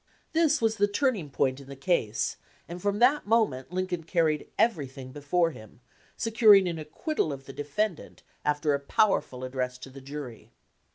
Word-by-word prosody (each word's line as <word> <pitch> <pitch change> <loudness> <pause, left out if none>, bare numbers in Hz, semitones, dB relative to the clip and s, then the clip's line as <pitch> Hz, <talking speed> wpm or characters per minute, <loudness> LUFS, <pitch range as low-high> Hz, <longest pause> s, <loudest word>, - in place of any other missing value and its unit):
This 315 -4 +3
was 220 0 +2
the 205 - +3
turning 205 - 0
point 130 0 0
in 140 - -13
the 140 - -7
case, 130 - 0 0.3
and 175 +1 -7
from 205 +1 0
that 255 +3 +3
moment 205 - +1
Lincoln 180 -1 -2
carried 160 -3 0
everything 140 - -1
before 165 +5 +1
him, 110 -5 -14 0.4
securing 215 -4 +5
an 170 -2 -3
acquittal 155 - -2
of 135 -1 -7
the 135 - -9
defendant 155 +7 -3 0.2
after 150 0 +1
a 140 - 0
powerful 140 -4 +1
address 125 -1 -3
to 130 +1 -11
the 135 +1 -11
jury. 135 -4 -8
155 Hz, 165 wpm, -28 LUFS, 135-205 Hz, 0.4 s, securing